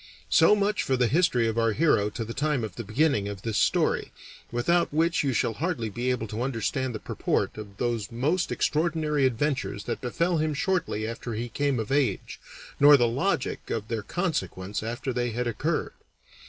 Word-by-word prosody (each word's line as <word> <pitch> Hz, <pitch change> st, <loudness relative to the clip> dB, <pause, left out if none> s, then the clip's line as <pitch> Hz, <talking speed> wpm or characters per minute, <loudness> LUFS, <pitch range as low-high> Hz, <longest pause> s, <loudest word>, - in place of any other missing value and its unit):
So 210 Hz, -, +6 dB
much 210 Hz, +1 st, +1 dB
for 130 Hz, -, 0 dB
the 125 Hz, -, +3 dB
history 125 Hz, -4 st, +2 dB
of 115 Hz, +1 st, 0 dB
our 115 Hz, -1 st, +2 dB
hero 120 Hz, -7 st, +3 dB
to 115 Hz, +2 st, -5 dB
the 115 Hz, -, -6 dB
time 150 Hz, -3 st, 0 dB
of 105 Hz, -4 st, -5 dB
the 120 Hz, -, -5 dB
beginning 110 Hz, -1 st, +1 dB
of 100 Hz, -2 st, -7 dB
this 110 Hz, -2 st, 0 dB
story, -, -, +1 dB, 0.4 s
without 170 Hz, +9 st, +1 dB
which 165 Hz, +3 st, +2 dB
you 140 Hz, -, +1 dB
shall 115 Hz, -1 st, 0 dB
hardly 125 Hz, -, -2 dB
be 120 Hz, +5 st, -2 dB
able 125 Hz, -3 st, 0 dB
to 110 Hz, +3 st, -4 dB
understand 130 Hz, 0 st, -1 dB
the -, -, -4 dB
purport -, -, -1 dB
of 105 Hz, -2 st, -9 dB
those 120 Hz, -2 st, -2 dB
most 150 Hz, +10 st, 0 dB
extraordinary 155 Hz, -3 st, +1 dB
adventures 130 Hz, -4 st, -2 dB
that -, -, -4 dB
befell 165 Hz, +7 st, 0 dB
him 155 Hz, -1 st, 0 dB
shortly 155 Hz, -, -1 dB
after 115 Hz, +1 st, -5 dB
he 120 Hz, +2 st, -3 dB
came 140 Hz, -1 st, 0 dB
of 110 Hz, +3 st, -4 dB
age, 135 Hz, -8 st, 0 dB, 0.4 s
nor 145 Hz, 0 st, +8 dB
the 120 Hz, -2 st, +3 dB
logic 135 Hz, +5 st, -1 dB
of 110 Hz, -1 st, -3 dB
their 115 Hz, -2 st, -2 dB
consequence 100 Hz, -, -3 dB
after 120 Hz, +4 st, -3 dB
they 120 Hz, 0 st, 0 dB
had 120 Hz, +2 st, -2 dB
occurred. 120 Hz, -3 st, -1 dB
125 Hz, 190 wpm, -27 LUFS, 115-150 Hz, 0.4 s, nor